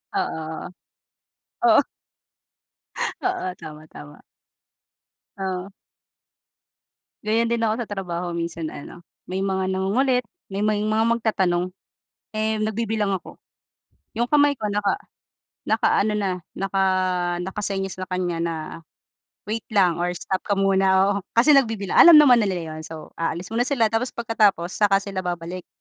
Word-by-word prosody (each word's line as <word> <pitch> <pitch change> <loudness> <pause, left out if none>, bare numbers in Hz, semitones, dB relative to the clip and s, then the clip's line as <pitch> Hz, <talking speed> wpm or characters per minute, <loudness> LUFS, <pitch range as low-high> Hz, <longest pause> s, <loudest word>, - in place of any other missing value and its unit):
Oo. 160 - -3 1.0
Oo. 225 +3 +7 1.4
Oo 370 - -1
tama, 155 -1 -11
tama. 75 - -13 1.2
Oh. 190 0 -3 1.5
Ganyan 230 +2 +1
din 235 - +1
ako 225 +3 -1
sa - - -14
trabaho 180 -3 -3
minsan 170 -1 -4
ano, 175 +4 -10 0.2
may 190 +1 -2
mga 190 -1 -1
nangungulit, 250 +7 +1 0.2
may 200 +1 -3
may 210 -1 +1
mga 215 +1 +1
magtatanong, 195 -6 +1 0.6
eh, 220 0 0
nagbibilang 215 -1 -1
ako, 190 - -5 0.8
yung 235 +2 -1
kamay 290 -1 +4
ko 210 -5 -3
naka 205 0 +1 0.7
naka-ano 210 +1 +2
na, 200 -2 0 0.2
naka 195 0 -1 0.6
naka-senyas 195 0 -3
sa 185 - -4
kanya 180 -2 -2
na, 170 0 -1 0.9
wait 220 +1 -4
lang 185 -5 +2
or 175 - +1
stop 190 +2 -2
ka 200 - -1
muna, 195 0 +3
oo, - - -3 0.2
kasi 255 +6 +6
nagbibilang 225 -8 +2
alam 340 -2 +10
naman 255 -6 +7
na 205 - +1
nila 170 -4 -3
yun - - -7
so 160 -1 -10
aalis 170 +3 -3
muna 245 +2 +1
sila 230 -6 +2
tapos 230 +3 0
pagkatapos 210 -7 +1
saka 205 -2 +3
sila 195 -2 -4
babalik. 175 0 -5
195 Hz, 135 wpm, -23 LUFS, 180-225 Hz, 1.5 s, alam